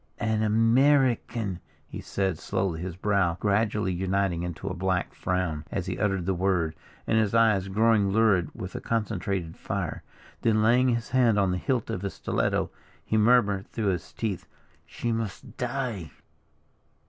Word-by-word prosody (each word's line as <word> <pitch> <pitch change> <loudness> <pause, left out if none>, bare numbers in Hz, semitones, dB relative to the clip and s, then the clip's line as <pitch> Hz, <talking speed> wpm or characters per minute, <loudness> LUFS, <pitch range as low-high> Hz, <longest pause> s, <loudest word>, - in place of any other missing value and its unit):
"An 110 0 0
American," 115 -2 +2 0.3
he - - -7
said, 95 -5 -2
slowly, 95 -4 -2
his 90 -1 -5
brow 95 -3 +1
gradually 105 -1 +1
uniting 95 -1 0
into 90 +2 -5
a 90 - -2
black 95 0 -1
frown, 90 -5 -2
as 95 - -2
he 90 -2 -4
uttered 95 -4 0
the 95 - +1
word, 90 -3 0 0.3
and 110 - +2
his 110 0 +1
eye 110 -3 +5
growing 105 0 +3
lurid 100 -4 +3
with - - -6
a - - -5
concentrated 100 -6 -2
fire, - - -4 0.4
then 110 -1 +3
laying 125 +3 +4
his 115 0 -1
hand 125 -5 +3
on 100 -2 +2
the 90 - -1
hilt 125 0 -1
of 90 - -3
his 100 -1 -4
stiletto, - - -1 0.3
he - - -1
murmured 105 -3 +3
through 110 -4 -1
his 90 -3 0
set - - -20
teeth, 105 -6 -3 0.4
"She 120 - -3
must 115 -4 -4
die." 120 - -3
100 Hz, 160 wpm, -27 LUFS, 95-115 Hz, 0.4 s, eye